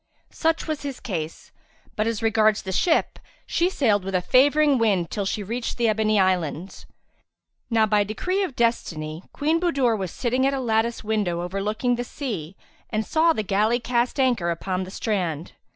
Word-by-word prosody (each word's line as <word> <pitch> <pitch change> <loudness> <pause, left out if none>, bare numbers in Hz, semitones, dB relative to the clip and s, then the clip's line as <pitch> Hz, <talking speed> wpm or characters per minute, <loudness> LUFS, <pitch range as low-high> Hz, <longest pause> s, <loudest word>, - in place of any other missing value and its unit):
Such 325 0 0
was 310 -2 -2
his 280 -2 -5
case; 165 -7 -5 0.4
but 215 +1 0
as 230 -1 -2
regards 215 -1 +3
the 190 - -4
ship 320 - +1 0.3
she 345 +2 +1
sailed 220 - +1
with 190 0 -3
a 180 - +2
favouring 285 +3 +4
wind 195 -7 +1
till 200 - -2
she 205 - -2
reached 230 +4 -4
the 235 -1 +2
Ebony 215 -1 +2
Islands. 180 -2 -1 0.8
Now 225 -2 +3
by 210 -1 +3
decree 360 - -2
of 355 -10 -3
destiny, 165 -9 -1
Queen 310 +3 +1
Budur 275 -10 +2
was 190 -4 -3
sitting 255 +7 0
at 275 - 0
a - - -2
lattice 230 -1 0
window 205 -6 -1
overlooking 210 +7 -1
the 245 - -2
sea 210 - -5 0.3
and 215 -1 -1
saw 330 +1 +3
the 215 - -1
galley 210 +5 +1
cast 245 +2 -1
anchor 240 -10 +2
upon 185 +2 -2
the - - -9
strand. 180 -8 -2
220 Hz, 175 wpm, -24 LUFS, 190-255 Hz, 0.8 s, favouring